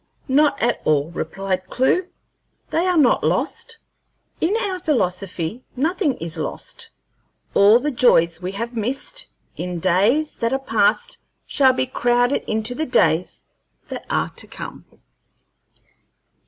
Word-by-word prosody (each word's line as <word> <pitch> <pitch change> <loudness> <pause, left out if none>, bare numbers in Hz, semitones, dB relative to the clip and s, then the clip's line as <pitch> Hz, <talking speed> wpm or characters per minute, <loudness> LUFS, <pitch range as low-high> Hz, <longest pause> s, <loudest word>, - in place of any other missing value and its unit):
"Not 285 +1 +3
at 240 0 0
all," 150 +1 +1
replied 185 +3 -3
Clewe; 345 +8 +1 0.6
"they 340 +3 +1
are 360 -2 +2
not 280 -6 +4
lost. 465 0 -1 0.6
In 360 +6 +1
our 380 -2 -2
philosophy, 195 - -1
nothing 315 +3 +1
is 165 0 -4
lost. - - -4 0.6
All 205 +3 +7
the 290 +4 -1
joys 170 - +3
we 185 +2 -4
have 230 +4 -4
missed 265 - -3 0.3
in 180 -1 -4
days 205 - +2
that 230 +1 0
are - - +3
past 485 - 0 0.3
shall 265 -2 +4
be 255 - 0
crowded 245 +1 +1
into 220 +2 -1
the 315 +5 -3
days 165 -7 +1 0.5
that - - -7
are - - 0
to - - -4
come." - - -9
245 Hz, 130 wpm, -21 LUFS, 185-295 Hz, 0.6 s, All